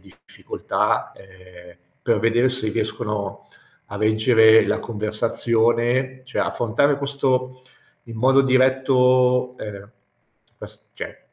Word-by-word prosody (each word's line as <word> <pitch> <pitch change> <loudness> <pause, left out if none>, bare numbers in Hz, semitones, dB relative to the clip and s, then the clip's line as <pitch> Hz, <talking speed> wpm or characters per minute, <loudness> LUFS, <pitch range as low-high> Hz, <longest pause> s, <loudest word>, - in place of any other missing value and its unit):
difficoltà, - - -4
ehm, 90 -2 -17 0.2
per - - 0
vedere 120 +3 +2
se 125 -4 -3
riescono 105 -3 -4 0.4
a 100 - -8
reggere 110 +1 +4
la 105 +2 -1
conversazione, 115 +3 -1
cioè, 130 - -4
affrontare 130 +5 0
questo 130 -2 -2 0.4
in 115 -1 -10
modo 135 +4 +4
diretto, 130 -1 +2
ehm 100 0 -9 0.7
quest - - -13
cioè - - -8
120 Hz, 100 wpm, -21 LUFS, 110-130 Hz, 0.7 s, reggere